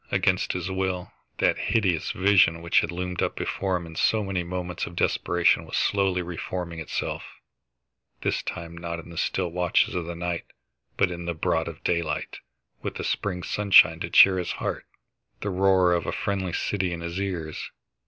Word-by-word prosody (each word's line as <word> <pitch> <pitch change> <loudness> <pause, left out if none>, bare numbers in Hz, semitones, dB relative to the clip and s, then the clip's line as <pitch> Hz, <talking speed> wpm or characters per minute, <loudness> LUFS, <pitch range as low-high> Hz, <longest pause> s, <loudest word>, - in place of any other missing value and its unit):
Against - - +1
his 90 +1 -3
will, 95 -1 -2 0.3
that - - +2
hideous 95 -7 +1
vision 90 -4 +3
which 85 - +4
had 85 - -1
loomed 90 0 -3
up - - 0
before 95 -1 -1
him 85 - -7
in 80 -1 -10
so 110 +6 +2
many 95 -2 -1
moments 90 0 -4
of 85 - -10
depression 90 0 +2
was - - -4
slowly 95 -3 +1
reforming 85 0 -5
itself, 80 - -3 1.0
this - - 0
time 85 0 -6
not 85 0 -5
in 85 0 -10
the - - -10
still 90 +1 0
watches 90 0 +2
of 90 -2 -2
the 85 0 -5
night 85 0 -3 0.5
but - - +3
in 85 0 -6
the 85 -1 -2
broad 80 - 0 0.2
daylight, 80 -3 -1 0.4
with - - -4
the - - -4
spring 90 -3 -2
sunshine 95 -5 +5
to 85 - -4
cheer 95 +1 +7
his 90 - -2
heart, - - -4 0.5
the 100 - -2
roar 95 -1 +4
of 85 -1 -1
a - - 0
friendly 95 -3 -2
city 95 -2 -1
in 85 -1 -4
his 85 +2 -4
ears. 85 -6 -4
90 Hz, 180 wpm, -26 LUFS, 85-95 Hz, 1.0 s, cheer